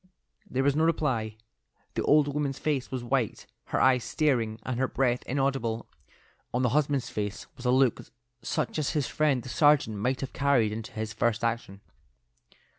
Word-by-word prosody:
There 130 Hz, +1 st, 0 dB
was 140 Hz, 0 st, +3 dB
no 155 Hz, -, +2 dB
reply; 130 Hz, -10 st, 0 dB, 0.6 s
the -, -, -1 dB
old 150 Hz, -1 st, +4 dB
woman's 145 Hz, -1 st, -2 dB
face 145 Hz, -5 st, -1 dB
was 130 Hz, -2 st, -4 dB
white, 120 Hz, -2 st, -1 dB, 0.2 s
her -, -, -1 dB
eyes 130 Hz, -2 st, +4 dB
staring, 115 Hz, -7 st, 0 dB
and 125 Hz, -1 st, -3 dB
her 130 Hz, -, +2 dB
breath 125 Hz, -2 st, +1 dB
inaudible; 135 Hz, -4 st, -1 dB, 0.7 s
on 125 Hz, +2 st, 0 dB
the 125 Hz, -, +3 dB
husband's 140 Hz, -2 st, +1 dB
face 105 Hz, -1 st, -4 dB
was 125 Hz, -, -11 dB
a -, -, +3 dB
look 130 Hz, -2 st, +3 dB, 0.4 s
such 115 Hz, -, -2 dB
as 150 Hz, -, -1 dB
his 150 Hz, -3 st, +1 dB
friend 140 Hz, -4 st, +1 dB
the 130 Hz, -, -8 dB
sergeant 140 Hz, -4 st, +3 dB
might 125 Hz, +5 st, -1 dB
have 135 Hz, -, -5 dB
carried 135 Hz, -7 st, +2 dB
into 110 Hz, +1 st, -6 dB
his 110 Hz, 0 st, -4 dB
first 115 Hz, +2 st, 0 dB
action. 115 Hz, -4 st, -2 dB
130 Hz, 175 wpm, -28 LUFS, 115-140 Hz, 0.7 s, old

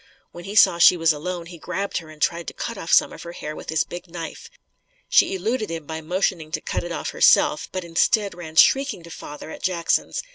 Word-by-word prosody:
When 175 Hz, -, -10 dB
he 200 Hz, +2 st, -6 dB
saw 170 Hz, -5 st, +6 dB
she 180 Hz, +1 st, +7 dB
was 165 Hz, -1 st, +3 dB
alone, 170 Hz, +3 st, -5 dB
he 170 Hz, 0 st, -11 dB
grabbed 195 Hz, +6 st, -3 dB
her 160 Hz, -2 st, -13 dB
and 155 Hz, -1 st, -14 dB
tried 170 Hz, +2 st, 0 dB
to -, -, -6 dB
cut 230 Hz, -, -4 dB
off 170 Hz, -4 st, -6 dB
some -, -, +4 dB
of -, -, -10 dB
her 170 Hz, -, -8 dB
hair 155 Hz, -2 st, -6 dB
with -, -, -10 dB
his 160 Hz, 0 st, +2 dB
big 175 Hz, +1 st, -9 dB
knife. 165 Hz, -1 st, -8 dB, 0.6 s
She -, -, +4 dB
eluded 215 Hz, +4 st, -2 dB
him 165 Hz, -2 st, -5 dB
by 160 Hz, +1 st, -6 dB
motioning 170 Hz, -1 st, -1 dB
to -, -, 0 dB
cut -, -, -3 dB
it 175 Hz, -, -6 dB
off -, -, -4 dB
herself, -, -, +4 dB
but 185 Hz, -1 st, -4 dB
instead, 200 Hz, +5 st, +1 dB
ran 165 Hz, -2 st, -10 dB
shrieking 270 Hz, -3 st, +4 dB
to 170 Hz, -, -12 dB
father 150 Hz, +1 st, -9 dB
at -, -, -9 dB
Jackson's. 180 Hz, -, 0 dB
170 Hz, 230 wpm, -23 LUFS, 165-185 Hz, 0.6 s, she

